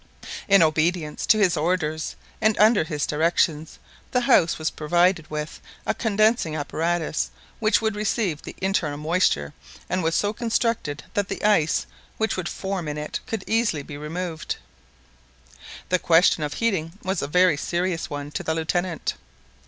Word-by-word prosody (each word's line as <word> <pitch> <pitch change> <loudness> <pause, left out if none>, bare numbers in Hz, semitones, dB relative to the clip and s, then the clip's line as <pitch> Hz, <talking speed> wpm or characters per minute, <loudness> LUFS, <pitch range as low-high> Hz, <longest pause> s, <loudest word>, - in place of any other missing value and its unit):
In 195 -3 +6
obedience 155 0 0
to 220 - +6
his 195 -5 +3
orders, 160 -1 -1 0.3
and 220 -1 +3
under 215 -1 +5
his 150 -3 -2
directions, 160 0 0 0.3
the 250 - +1
house 240 -10 +4
was 155 0 -1
provided 175 +1 +1
with 150 0 -5 0.2
a - - +1
condensing 215 -6 +2
apparatus 160 +2 -1 0.3
which 220 +1 +2
would 220 -1 0
receive 210 -6 -1
the - - -9
internal 185 -6 0
moisture, 150 - +1 0.3
and 185 +1 -1
was 165 0 0
so 205 +1 +1
constructed 225 -10 -1
that 205 -1 0
the - - -5
ice 205 -7 +3 0.3
which 220 0 0
would 180 -2 -3
form 190 -4 -4
in 150 0 -3
it 150 0 -4
could 225 -5 -3
easily 220 -10 +1
be 145 - -9
removed. 160 +3 -4 1.3
This 185 -1 +2
question 165 -1 +4
of 150 -1 -3
heating 190 -8 -1
was 190 +1 -1
a 140 - -2
very 180 +1 +4
serious 175 +3 -2
one 145 0 -5
to - - -3
the 160 - -1
Lieutenant. 165 +1 -1
175 Hz, 155 wpm, -24 LUFS, 155-200 Hz, 1.3 s, In